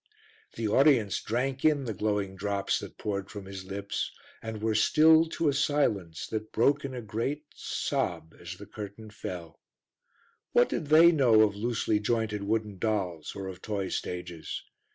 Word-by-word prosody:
The 115 Hz, -, -1 dB
audience 115 Hz, -, +4 dB
drank 130 Hz, +3 st, -2 dB
in 150 Hz, -3 st, +3 dB
the 115 Hz, -, -2 dB
glowing 100 Hz, -1 st, -1 dB
drops 100 Hz, +1 st, -1 dB
that -, -, -9 dB
poured 100 Hz, -2 st, -3 dB
from 100 Hz, -2 st, -8 dB
his 95 Hz, -1 st, -8 dB
lips, 100 Hz, +1 st, -3 dB, 0.3 s
and 110 Hz, -1 st, -5 dB
were 110 Hz, +1 st, 0 dB
stilled 160 Hz, +8 st, +5 dB
to 165 Hz, -, 0 dB
a 145 Hz, -, +3 dB
silence 110 Hz, -, 0 dB
that 110 Hz, -1 st, -4 dB
broke 140 Hz, +5 st, +3 dB
in 135 Hz, -2 st, -5 dB
a 120 Hz, -, -5 dB
great 115 Hz, +8 st, -2 dB
sob 80 Hz, -, -2 dB
as 85 Hz, +1 st, -7 dB
the 105 Hz, -, -10 dB
curtain 105 Hz, +1 st, -9 dB
fell. 90 Hz, -6 st, -7 dB, 0.9 s
What 120 Hz, -, +5 dB
did 155 Hz, -, -2 dB
they 160 Hz, +3 st, +8 dB
know 125 Hz, -9 st, +5 dB
of 105 Hz, -2 st, +3 dB
loosely 110 Hz, -1 st, 0 dB
jointed 110 Hz, -1 st, -1 dB
wooden 105 Hz, -1 st, -1 dB
dolls 95 Hz, -8 st, -2 dB
or 100 Hz, -1 st, -5 dB
of 95 Hz, -1 st, -7 dB
toy 100 Hz, -3 st, -3 dB
stages? 90 Hz, -2 st, -5 dB
110 Hz, 165 wpm, -29 LUFS, 100-125 Hz, 0.9 s, they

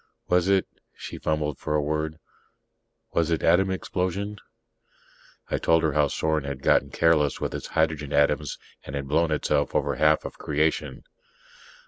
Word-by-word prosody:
Was 90 Hz, 0 st, +3 dB
it 95 Hz, -1 st, +3 dB
" -, -, -50 dB
She -, -, -8 dB
fumbled 75 Hz, -2 st, -1 dB
for 75 Hz, -, -2 dB
a 75 Hz, -, +2 dB
word 75 Hz, +1 st, -2 dB, 1.0 s
"was 85 Hz, -1 st, +1 dB
it 80 Hz, -, 0 dB
atom 90 Hz, +4 st, +4 dB
explosion?" 95 Hz, +2 st, -3 dB, 1.1 s
I -, -, 0 dB
told 80 Hz, 0 st, +3 dB
her 80 Hz, -2 st, +1 dB
how 75 Hz, -1 st, +3 dB
Sorn 80 Hz, +1 st, -1 dB
had 70 Hz, -1 st, -6 dB
gotten 70 Hz, -, +3 dB
careless 75 Hz, -1 st, +2 dB
with -, -, -3 dB
its -, -, -5 dB
hydrogen 80 Hz, -3 st, +1 dB
atoms 75 Hz, 0 st, +1 dB, 0.3 s
and 65 Hz, -, -7 dB
had 70 Hz, -1 st, -4 dB
blown 80 Hz, +4 st, +2 dB
itself 75 Hz, -, 0 dB
over -, -, 0 dB
half 75 Hz, 0 st, +3 dB
of -, -, -8 dB
creation. 75 Hz, +2 st, -1 dB
80 Hz, 160 wpm, -25 LUFS, 75-85 Hz, 1.1 s, atom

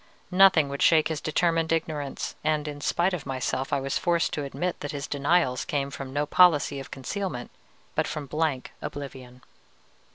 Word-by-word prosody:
Nothing 180 Hz, -5 st, +6 dB
would 140 Hz, 0 st, -4 dB
shake 160 Hz, -2 st, +5 dB
his 155 Hz, -3 st, -3 dB
determined 165 Hz, +1 st, +1 dB
ignorance, 155 Hz, -4 st, -2 dB
and 155 Hz, -1 st, 0 dB
in 145 Hz, -1 st, -6 dB
spite 175 Hz, +5 st, +1 dB
of 165 Hz, -6 st, -4 dB
myself 130 Hz, 0 st, -2 dB
I 140 Hz, -, +2 dB
was 135 Hz, 0 st, -1 dB
forced 170 Hz, -1 st, +1 dB
to 150 Hz, -, -2 dB
admit 175 Hz, +6 st, -3 dB
that 145 Hz, -, -5 dB
his 140 Hz, -1 st, -4 dB
denials 145 Hz, -2 st, +1 dB
came 140 Hz, -1 st, -2 dB
from 135 Hz, -1 st, -7 dB
no 145 Hz, +2 st, 0 dB
policy 150 Hz, -4 st, +4 dB
of 135 Hz, -, -8 dB
concealment, 135 Hz, -1 st, -4 dB, 0.4 s
but -, -, 0 dB
from 150 Hz, -2 st, -4 dB
blank 150 Hz, -2 st, -1 dB
oblivion. 130 Hz, -3 st, -8 dB
145 Hz, 170 wpm, -26 LUFS, 135-165 Hz, 0.4 s, Nothing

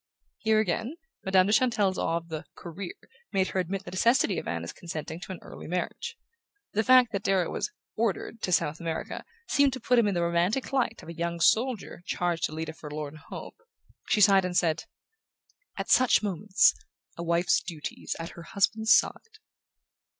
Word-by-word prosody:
Here 220 Hz, 0 st, +3 dB
again, 220 Hz, -, -1 dB, 0.3 s
Madame 190 Hz, -1 st, +4 dB
de 205 Hz, -, +1 dB
Chantelle's 215 Hz, -6 st, +2 dB
awe 165 Hz, -, +1 dB
of 170 Hz, 0 st, -8 dB
the 160 Hz, 0 st, -5 dB
Career 175 Hz, +2 st, -7 dB, 0.4 s
made 190 Hz, -1 st, +1 dB
her 190 Hz, -, -1 dB
admit 185 Hz, +2 st, -2 dB
the 175 Hz, -, -7 dB
necessity 215 Hz, +1 st, +3 dB
of -, -, -8 dB
Anna's 85 Hz, 0 st, -3 dB
consenting 160 Hz, -1 st, -6 dB
to 190 Hz, -, -8 dB
an 185 Hz, -, -5 dB
early -, -, -10 dB
marriage. 320 Hz, -, -3 dB, 0.6 s
The 220 Hz, -, +2 dB
fact 255 Hz, -1 st, +6 dB
that 200 Hz, -, -2 dB
Darrow 190 Hz, -4 st, +1 dB
was -, -, -2 dB, 0.2 s
"ordered" 225 Hz, 0 st, -2 dB
to 180 Hz, -, -2 dB
South 155 Hz, -2 st, +1 dB
America 165 Hz, -1 st, -4 dB, 0.2 s
seemed 280 Hz, -2 st, +3 dB
to 260 Hz, -, -4 dB
put 245 Hz, +1 st, +3 dB
him 225 Hz, -, +3 dB
in 200 Hz, -, 0 dB
the 170 Hz, -, +1 dB
romantic 175 Hz, +11 st, 0 dB
light 245 Hz, -4 st, 0 dB
of -, -, -10 dB
a -, -, -5 dB
young 170 Hz, 0 st, -3 dB
soldier 225 Hz, 0 st, +1 dB
charged 175 Hz, -2 st, 0 dB
to -, -, -4 dB
lead 160 Hz, +1 st, -4 dB
a -, -, -5 dB
forlorn 150 Hz, -1 st, -7 dB
hope: -, -, -8 dB, 0.5 s
she 210 Hz, -, +3 dB
sighed 195 Hz, -1 st, +6 dB
and 180 Hz, -1 st, -1 dB
said: 160 Hz, -2 st, +1 dB, 0.9 s
"At -, -, -3 dB
such 255 Hz, -3 st, +5 dB
moments 200 Hz, 0 st, +3 dB, 0.4 s
a -, -, -6 dB
wife's 170 Hz, +1 st, +2 dB
duty 160 Hz, -4 st, -7 dB
is -, -, -3 dB
at 165 Hz, 0 st, -5 dB
her 170 Hz, -, -11 dB
husband's 220 Hz, +5 st, +3 dB
side." 450 Hz, -1 st, -3 dB
185 Hz, 185 wpm, -28 LUFS, 170-220 Hz, 0.9 s, fact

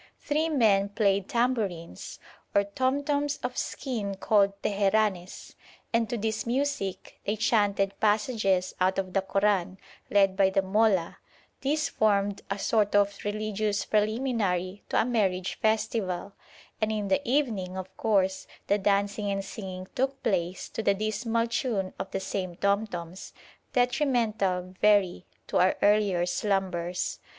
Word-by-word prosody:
Three 310 Hz, +2 st, 0 dB
men 210 Hz, -9 st, +3 dB
played 200 Hz, -2 st, +1 dB
tambourines 215 Hz, -, -2 dB, 0.4 s
or 200 Hz, -, +5 dB
tom 260 Hz, +7 st, -1 dB
toms 285 Hz, 0 st, 0 dB
of 250 Hz, 0 st, -3 dB
skin 220 Hz, -7 st, -3 dB
called 200 Hz, 0 st, +2 dB
teheranes, 200 Hz, -2 st, 0 dB, 0.4 s
and 230 Hz, -2 st, +2 dB
to 240 Hz, -, -2 dB
this 220 Hz, +1 st, -2 dB
music 255 Hz, -6 st, -2 dB
they 205 Hz, -, -1 dB
chanted 205 Hz, -3 st, +2 dB
passages 210 Hz, -3 st, +1 dB
out 185 Hz, +1 st, +2 dB
of 185 Hz, -1 st, -2 dB
the 195 Hz, -, +2 dB
Koran, 195 Hz, -2 st, +1 dB, 0.3 s
led 195 Hz, -2 st, +4 dB
by 195 Hz, -1 st, +4 dB
the 195 Hz, 0 st, +1 dB
'mollah'; 195 Hz, -3 st, +2 dB, 0.4 s
this 305 Hz, +3 st, +1 dB
formed 205 Hz, -2 st, +1 dB
a 200 Hz, -, -1 dB
sort 205 Hz, 0 st, +1 dB
of 200 Hz, 0 st, +3 dB
religious 210 Hz, 0 st, -1 dB
preliminary 210 Hz, -4 st, 0 dB
to -, -, +2 dB
a -, -, +3 dB
marriage 195 Hz, -7 st, 0 dB
festival; 205 Hz, -3 st, 0 dB, 0.5 s
and 215 Hz, 0 st, +1 dB
in 210 Hz, -2 st, -2 dB
the 190 Hz, -, +2 dB
evening, 230 Hz, -10 st, 0 dB
of 190 Hz, 0 st, -7 dB
course, 190 Hz, -3 st, +1 dB, 0.2 s
the 205 Hz, -, +2 dB
dancing 200 Hz, +1 st, +1 dB
and 195 Hz, 0 st, -2 dB
singing 185 Hz, -2 st, -7 dB
took 270 Hz, +1 st, -1 dB
place 180 Hz, -1 st, -1 dB
to -, -, -4 dB
the 200 Hz, -2 st, +2 dB
dismal 220 Hz, +3 st, -1 dB
tune 230 Hz, -5 st, -2 dB
of -, -, -4 dB
the 195 Hz, -, -3 dB
same 185 Hz, -2 st, -4 dB
tom 200 Hz, +4 st, +1 dB
toms, 175 Hz, -1 st, -8 dB, 0.4 s
detrimental, 230 Hz, -8 st, +1 dB
very, 200 Hz, -4 st, +3 dB, 0.2 s
to -, -, -1 dB
our 185 Hz, +1 st, +4 dB
earlier 205 Hz, -4 st, +3 dB
slumbers. 180 Hz, -2 st, -1 dB
205 Hz, 140 wpm, -28 LUFS, 190-225 Hz, 0.5 s, or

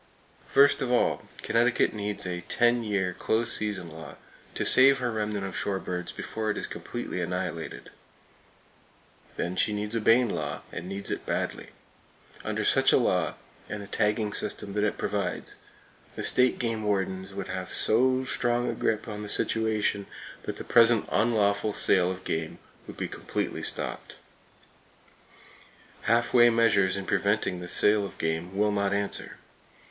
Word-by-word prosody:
First 145 Hz, +1 st, +5 dB
of 125 Hz, -2 st, -1 dB
all, 125 Hz, -, +1 dB, 0.2 s
Connecticut 115 Hz, +1 st, +2 dB
needs 105 Hz, -2 st, -4 dB
a 90 Hz, -1 st, -3 dB
ten 120 Hz, 0 st, +3 dB
year 100 Hz, -4 st, 0 dB
close 115 Hz, +5 st, 0 dB
season 100 Hz, -6 st, -3 dB
law 80 Hz, -1 st, -10 dB, 0.4 s
to -, -, -1 dB
save 135 Hz, +1 st, +6 dB
her 125 Hz, -2 st, -1 dB
remnant 105 Hz, -2 st, -2 dB
of 95 Hz, -, -6 dB
shore 100 Hz, -1 st, -1 dB
birds 90 Hz, -2 st, -4 dB
before 110 Hz, -1 st, -4 dB
it 105 Hz, -, -1 dB
is -, -, -3 dB
completely 90 Hz, -, -5 dB
annihilated. 90 Hz, -2 st, -4 dB, 1.4 s
Then 90 Hz, +1 st, -2 dB
she 105 Hz, -, +1 dB
needs 105 Hz, +1 st, -3 dB
a 115 Hz, -, 0 dB
Bayne 115 Hz, +2 st, +4 dB
law, 75 Hz, -1 st, -4 dB
and 90 Hz, +2 st, -6 dB
needs 100 Hz, +1 st, -5 dB
it -, -, -3 dB
badly. -, -, -2 dB, 0.8 s
Under -, -, -2 dB
such -, -, +4 dB
a -, -, +6 dB
law, -, -, +1 dB, 0.3 s
and 105 Hz, -, -4 dB
the -, -, -8 dB
tagging 105 Hz, +1 st, 0 dB
system 100 Hz, -1 st, -4 dB
that 105 Hz, 0 st, 0 dB
it 105 Hz, -, 0 dB
provides, -, -, -2 dB, 0.6 s
the -, -, -4 dB
state 125 Hz, 0 st, +3 dB
game 115 Hz, -2 st, -2 dB
wardens 95 Hz, -2 st, -2 dB
would 100 Hz, -1 st, -5 dB
have 90 Hz, 0 st, -4 dB
so 130 Hz, +3 st, +2 dB
strong 120 Hz, -1 st, 0 dB
a -, -, 0 dB
grip 110 Hz, +1 st, -1 dB
on 105 Hz, -1 st, -5 dB
the 105 Hz, -, -6 dB
situation 110 Hz, -2 st, 0 dB, 0.3 s
that -, -, -5 dB
the -, -, -6 dB
present 115 Hz, -2 st, +5 dB
unlawful 105 Hz, -2 st, +2 dB
sale 90 Hz, -3 st, +2 dB
of 95 Hz, 0 st, -5 dB
game 80 Hz, 0 st, -3 dB, 0.3 s
would -, -, -9 dB
be -, -, -2 dB
completely -, -, -4 dB
stopped. -, -, -5 dB, 1.9 s
Half 120 Hz, +1 st, +2 dB
way 120 Hz, -1 st, +7 dB
measures 105 Hz, -5 st, +3 dB
in 100 Hz, -, -4 dB
preventing 100 Hz, -2 st, 0 dB
the 90 Hz, -, -7 dB
sale 105 Hz, +3 st, +3 dB
of 100 Hz, -, -7 dB
game 80 Hz, +4 st, -2 dB
will 105 Hz, +1 st, +3 dB
not 100 Hz, -1 st, 0 dB
answer. 100 Hz, 0 st, -3 dB
105 Hz, 160 wpm, -27 LUFS, 95-115 Hz, 1.9 s, way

